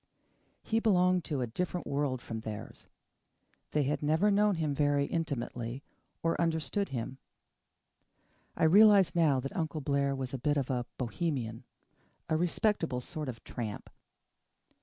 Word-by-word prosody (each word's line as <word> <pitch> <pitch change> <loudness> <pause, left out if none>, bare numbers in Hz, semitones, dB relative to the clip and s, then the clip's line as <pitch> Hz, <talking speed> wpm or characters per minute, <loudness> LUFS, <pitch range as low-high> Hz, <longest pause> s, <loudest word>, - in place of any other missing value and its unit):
He 225 - +1
belonged 180 -5 +3
to 145 -4 -2
a - - +1
different 180 +9 -3
world 140 -3 -1
from 115 - -5
theirs. 110 -1 -8 0.8
They 150 - +1
had 145 +2 -1
never 160 +8 +3
known 205 0 +3
him 155 -3 -1
very 145 0 +2
intimately 135 -5 -3 0.4
or 165 +1 +1
understood 170 +5 0
him. 130 +1 -4 1.4
I - - 0
realize 195 +1 +7
now 155 -6 +3
that 135 - -6
Uncle 160 -3 -2
Blair 140 -1 0
was 130 -1 -4
a 135 - -3
bit 145 +3 +1
of 135 -2 -1
a 120 -2 -1
Bohemian 125 -3 -3 0.6
a 160 - +2
respectable 170 - +1
sort 150 +2 -5
of 115 -2 -8
tramp. 110 -4 -6
145 Hz, 140 wpm, -31 LUFS, 130-170 Hz, 1.4 s, realize